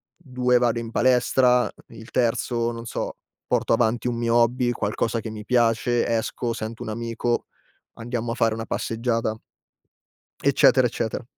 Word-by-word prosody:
2 125 Hz, -5 st, +1 dB
vado 120 Hz, -1 st, +1 dB
in 115 Hz, -1 st, -6 dB
palestra, 125 Hz, 0 st, +3 dB
uhm, 105 Hz, -, -10 dB
il 110 Hz, +1 st, -12 dB
terzo 120 Hz, -1 st, 0 dB
non 115 Hz, 0 st, -7 dB
so, -, -, -4 dB, 0.3 s
porto -, -, +1 dB
avanti 115 Hz, +1 st, +1 dB
un 120 Hz, -, -1 dB
mio 115 Hz, 0 st, +1 dB
hobby, 120 Hz, +1 st, +3 dB
qualcosa 115 Hz, +1 st, -1 dB
che 110 Hz, -, -6 dB
mi 105 Hz, -1 st, -7 dB
piace, 120 Hz, 0 st, +2 dB
esco, 115 Hz, +1 st, -1 dB
sento 110 Hz, +1 st, -6 dB
un -, -, -6 dB
amico, 115 Hz, +1 st, -2 dB, 0.5 s
andiamo 115 Hz, 0 st, -4 dB
a -, -, -6 dB
fare 115 Hz, -3 st, +2 dB
una 115 Hz, 0 st, -5 dB
passeggiata, 115 Hz, -1 st, -1 dB, 1.1 s
eccetera, 130 Hz, -2 st, +5 dB
eccetera. 115 Hz, 0 st, -3 dB
115 Hz, 155 wpm, -24 LUFS, 115-125 Hz, 1.1 s, eccetera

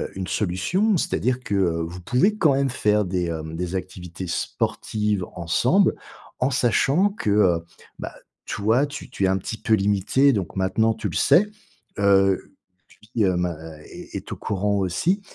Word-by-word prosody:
une 95 Hz, -1 st, -4 dB
solution. 110 Hz, -, +1 dB
C'est-à-dire 130 Hz, -4 st, 0 dB
que 105 Hz, -, -3 dB
vous 85 Hz, -1 st, -1 dB
pouvez 160 Hz, -, +2 dB
quand 155 Hz, -8 st, +4 dB
même 135 Hz, 0 st, +1 dB
faire 105 Hz, -4 st, +2 dB
des, 90 Hz, -1 st, -1 dB
hem, 80 Hz, -1 st, -5 dB
des 90 Hz, +2 st, -3 dB
activités 90 Hz, -1 st, -6 dB
sportives 105 Hz, +3 st, -1 dB
ensemble, 85 Hz, -1 st, +2 dB, 0.4 s
en 130 Hz, +2 st, +1 dB
sachant 135 Hz, -, +2 dB
que, 200 Hz, -, -4 dB
heu, 90 Hz, -5 st, +3 dB, 0.3 s
bah, -, -, -6 dB, 0.3 s
toi 110 Hz, +7 st, +1 dB
tu 145 Hz, -, -8 dB
tu 100 Hz, -, 0 dB
es -, -, +4 dB
un 95 Hz, 0 st, +2 dB
petit 110 Hz, +4 st, -5 dB
peu 110 Hz, -, +1 dB
limitée, 105 Hz, +7 st, +3 dB
donc 100 Hz, -6 st, -3 dB
maintenant, 95 Hz, +4 st, +1 dB
tu -, -, -4 dB
le -, -, -7 dB
sais, 200 Hz, -, +5 dB, 0.5 s
heu, 95 Hz, -1 st, +3 dB, 0.6 s
lui, 115 Hz, -, +3 dB
bah, 90 Hz, -2 st, -1 dB, 0.3 s
est -, -, -11 dB
est -, -, -6 dB
au -, -, -3 dB
courant 100 Hz, 0 st, -1 dB
aussi 100 Hz, -, 0 dB
100 Hz, 160 wpm, -23 LUFS, 90-125 Hz, 0.6 s, sais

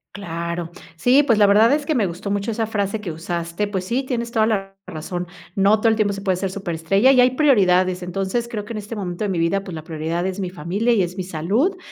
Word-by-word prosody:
Claro, 170 Hz, -3 st, -4 dB, 0.3 s
sí, 250 Hz, -, +4 dB
pues, 230 Hz, -6 st, +3 dB
la 205 Hz, -, +7 dB
verdad 210 Hz, +3 st, +5 dB
es 295 Hz, 0 st, +1 dB
que 310 Hz, -, 0 dB
me 225 Hz, -5 st, +2 dB
gustó 180 Hz, +3 st, -4 dB
mucho 200 Hz, +3 st, -1 dB
esa 225 Hz, 0 st, -1 dB
frase 210 Hz, -1 st, -1 dB
que 185 Hz, -6 st, -5 dB
usaste, 170 Hz, +3 st, -3 dB
pues 190 Hz, -3 st, -3 dB
sí, 245 Hz, +7 st, -1 dB
tienes 235 Hz, -3 st, -3 dB
toda 220 Hz, -2 st, +3 dB
la 195 Hz, -3 st, -2 dB
razón, 175 Hz, +3 st, -5 dB, 0.3 s
no 200 Hz, +2 st, +4 dB
todo 225 Hz, -, +2 dB
el 220 Hz, -, +4 dB
tiempo 210 Hz, -2 st, +1 dB
se 200 Hz, -, -6 dB
puede 190 Hz, -2 st, +1 dB
ser 185 Hz, +1 st, -3 dB
súper 190 Hz, -3 st, -4 dB
estrella 195 Hz, +11 st, +3 dB
y 255 Hz, -, +6 dB
hay 250 Hz, 0 st, +5 dB
prioridades 185 Hz, -10 st, +3 dB
entonces, 195 Hz, +6 st, -2 dB
creo 210 Hz, -2 st, -4 dB
que 230 Hz, -, -7 dB
en -, -, -4 dB
este 210 Hz, +2 st, -7 dB
momento 180 Hz, -1 st, -4 dB
de 205 Hz, -, -1 dB
mi 180 Hz, -3 st, -1 dB
vida, 170 Hz, +4 st, +1 dB
pues, 185 Hz, -, -8 dB
la 155 Hz, -1 st, -7 dB
prioridad 165 Hz, +2 st, -3 dB
es 190 Hz, +1 st, -4 dB
mi 185 Hz, -, -2 dB
familia 185 Hz, +7 st, -1 dB
y 225 Hz, -4 st, +3 dB
es 180 Hz, 0 st, -2 dB
mi 190 Hz, -, -3 dB
salud, 195 Hz, -, 0 dB
195 Hz, 255 wpm, -21 LUFS, 175-225 Hz, 0.3 s, la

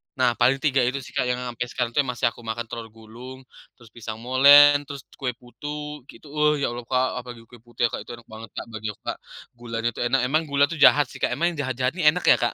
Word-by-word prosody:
Nah, 130 Hz, -3 st, +3 dB
paling 130 Hz, +3 st, +3 dB
3 140 Hz, -3 st, +2 dB
itu 130 Hz, +2 st, 0 dB
sih -, -, -12 dB
Kak, 125 Hz, -, -1 dB
yang 125 Hz, 0 st, 0 dB
sampai 120 Hz, -1 st, -4 dB
sekarang 125 Hz, -1 st, -3 dB
itu, 130 Hz, -, -1 dB
masih 120 Hz, -1 st, 0 dB
aku -, -, -17 dB
makan, 115 Hz, +1 st, -3 dB
telur 115 Hz, -1 st, -6 dB
gulung, 115 Hz, +4 st, -12 dB, 0.3 s
terus 115 Hz, -2 st, -18 dB
pisang 115 Hz, -1 st, -7 dB
molen, 145 Hz, +3 st, +7 dB
terus 140 Hz, -2 st, -7 dB, 0.2 s
kue 130 Hz, -3 st, -2 dB
putu 150 Hz, +3 st, -8 dB
gitu, 150 Hz, -, -15 dB
"Wah, 150 Hz, 0 st, +2 dB
ya -, -, +1 dB
Allah 120 Hz, 0 st, -7 dB
Kak," 130 Hz, +1 st, +1 dB
apalagi 120 Hz, -1 st, -10 dB
kue 120 Hz, -, -14 dB
putu 120 Hz, 0 st, -11 dB
ya 120 Hz, -, +4 dB
Kak, -, -, -6 dB
itu -, -, -8 dB
enak 120 Hz, -1 st, -18 dB
banget 110 Hz, 0 st, -10 dB
Kak, -, -, -5 dB
bagi 110 Hz, -1 st, -6 dB
aku -, -, -30 dB
Kak, -, -, -3 dB, 0.4 s
gulanya 115 Hz, -1 st, -3 dB
itu -, -, -12 dB
enak, 130 Hz, +2 st, +2 dB
emang 155 Hz, +4 st, +2 dB
gula 140 Hz, -1 st, +1 dB
itu 165 Hz, -, -5 dB
jahat 145 Hz, 0 st, +5 dB
sih -, -, -11 dB
Kak, -, -, -1 dB
emang 170 Hz, +3 st, 0 dB
yang 150 Hz, -5 st, -4 dB
jahat-jahat 130 Hz, 0 st, -1 dB
ini 175 Hz, -, -1 dB
enak 180 Hz, -, -4 dB
ya -, -, +7 dB
Kak? 120 Hz, -, 0 dB
125 Hz, 260 wpm, -24 LUFS, 120-140 Hz, 0.4 s, molen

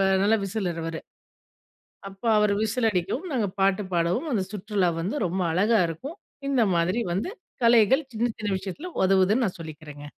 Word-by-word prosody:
வ 195 Hz, -, +3 dB, 0.2 s
நல்ல 220 Hz, +3 st, +4 dB
விசிலர் 185 Hz, -4 st, -3 dB
அவரு. 165 Hz, 0 st, -4 dB, 1.1 s
அப்ப 195 Hz, 0 st, -16 dB, 0.2 s
அவரு 210 Hz, -1 st, +3 dB
விசில் 225 Hz, +2 st, +1 dB
அடிக்கவும், 200 Hz, -, -2 dB
நாங்க 230 Hz, -6 st, +1 dB
பாட்டு 195 Hz, +1 st, +3 dB
பாடவும் 175 Hz, -, 0 dB
அந்த 205 Hz, -5 st, +1 dB
சுற்றுலா 205 Hz, -2 st, 0 dB
வந்து 185 Hz, -, -2 dB
ரொம்ப 185 Hz, +2 st, -1 dB
அழகா 210 Hz, +4 st, +3 dB
இருக்கும். 265 Hz, -, -7 dB, 0.3 s
இந்த 260 Hz, -4 st, +3 dB
மாதிரி 180 Hz, +7 st, +1 dB
வந்து 200 Hz, -, -2 dB, 0.3 s
கலைகள் 240 Hz, +5 st, +5 dB
சின்ன 235 Hz, +2 st, +1 dB
சின்ன 210 Hz, -2 st, -3 dB
விஷயத்துல 200 Hz, -, -6 dB, 0.2 s
உதவுதுன்னு 195 Hz, +5 st, +3 dB
நான் 180 Hz, -, -5 dB
சொல்லிக்கிறேங்க. 150 Hz, -2 st, -9 dB
200 Hz, 160 wpm, -25 LUFS, 180-230 Hz, 1.1 s, கலைகள்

